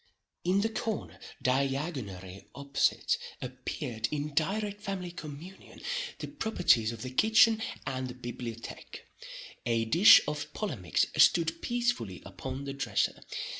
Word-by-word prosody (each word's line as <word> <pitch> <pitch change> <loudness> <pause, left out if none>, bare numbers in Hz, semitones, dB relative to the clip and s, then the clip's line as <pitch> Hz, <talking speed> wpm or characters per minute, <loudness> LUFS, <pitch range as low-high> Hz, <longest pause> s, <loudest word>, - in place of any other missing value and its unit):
In 185 +3 +3
the 225 - +1
corner 220 -1 -4 0.2
diagonary 130 - -2
opposite, 140 0 +1 0.2
appeared, 110 -2 -4
in 150 0 -3
direct 205 +6 -1
family 185 -3 -4
communion, 165 +3 -10 0.4
the - - -5
properties 180 - +2
of 115 -1 -7
the 130 - -5
kitchen 220 - +5 0.2
and 130 -1 -2
the 125 - -8
bibliotheque. 120 -2 -7 0.6
A 115 -1 +2
dish 170 - +9
of 150 0 -3
polemics 120 - 0
stood 165 -1 +4
peacefully 240 - -1
upon 130 +8 -6
the 140 - -4
dresser. 125 -7 -1
140 Hz, 120 wpm, -30 LUFS, 120-190 Hz, 0.6 s, dish